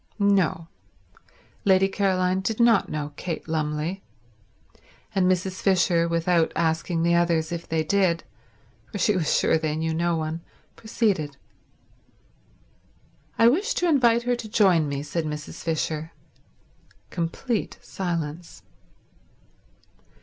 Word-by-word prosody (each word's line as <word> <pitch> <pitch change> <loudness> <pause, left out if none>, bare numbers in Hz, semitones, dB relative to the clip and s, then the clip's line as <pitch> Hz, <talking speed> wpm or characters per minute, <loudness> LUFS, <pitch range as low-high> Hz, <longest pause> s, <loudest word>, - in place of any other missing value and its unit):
No, 195 -5 +2 1.0
Lady 190 -1 +4
Caroline 190 -2 +1
did 215 +4 -2
not 235 -3 +4
know 150 -1 -4
Kate 170 -3 -5
Lumley; 155 +3 -2 1.1
and 185 -1 +3
Mrs. 185 +1 -2
Fisher, 180 -3 +3
without 170 0 +1
asking 165 +1 0
the 170 0 +3
others 170 -2 +1
if 170 -1 -5
they 160 -1 0
did, 175 -1 +1 0.7
for 210 - -4
she 205 +2 +2
was 170 -4 +1
sure 160 - +2
they 155 -1 -2
knew 160 +1 -1
no 170 +1 0
one, 160 +1 -3 0.3
proceeded. 195 - -1 2.0
"I 230 - +6
wish 395 - +2
to 355 - +1
invite 240 -7 +3
her 245 0 +1
to 220 -2 -7
join 185 -8 +3
me," 140 0 -3
said 165 +2 -3
Mrs. 150 -1 -6
Fisher. 160 -1 -2 1.0
Complete 185 +7 -2
silence. 170 -3 -5
170 Hz, 120 wpm, -25 LUFS, 160-195 Hz, 2.0 s, I